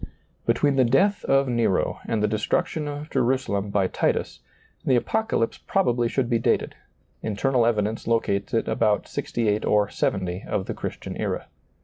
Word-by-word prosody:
Between 135 +4 +2
the 130 - +6
death 185 - +3
of 135 0 +3
Nero 115 -6 +1
and 110 -2 0
the - - +4
destruction 145 +8 -1
of 145 +1 -6
Jerusalem 120 -6 0
by 100 -1 +2
Titus, - - -1 0.4
the 130 - +3
Apocalypse 220 - 0
probably 120 -11 +1
should 130 -1 0
be 120 -2 +1
dated; - - +1 0.5
internal 115 +3 +1
evidence 110 -1 0
locates 100 -4 0
it 115 - 0
about 105 -2 +1
68 110 -2 -1
or 105 -1 +2
70 90 -2 -1
of 95 - -1
the - - -3
Christian - - -6
era. - - -2
115 Hz, 150 wpm, -24 LUFS, 105-135 Hz, 0.5 s, the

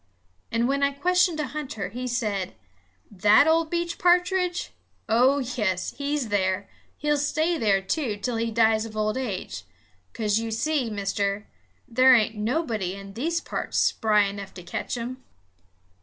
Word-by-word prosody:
And 230 +1 +1
when 280 +1 0
I 280 0 +2
questioned 360 +2 +2
a 300 - 0
hunter, 260 -10 -5
he 250 +4 -5
said: 210 -6 -2 0.6
"That 210 +6 +5
ol' 325 +1 +3
beech 340 +1 -3
pa'tridge? 360 0 +2 0.4
Oh, 250 +5 +4
yes, 220 -9 -1
he's 285 -4 -2
there. 190 -1 0 0.3
He'll 295 0 +1
stay 315 +4 0
there, 195 -3 +2
too, 225 0 -1
till 230 +3 -2
he 230 0 -1
dies 220 -1 +3
of 220 -1 -8
old 215 0 0
age; 190 - -4 0.5
'cause 210 -1 0
you 225 0 -3
see, 255 +3 0
Mister, 200 0 -2 0.4
there 255 +1 +6
ain't 220 -2 +2
nobody 220 - -1
in 195 0 -10
these 325 +10 -1
parts - - -4
spry 210 -2 +3
enough 200 -1 -5
to 180 - -9
ketch 210 - -4
'im." 250 +2 -6
230 Hz, 155 wpm, -25 LUFS, 205-290 Hz, 0.6 s, there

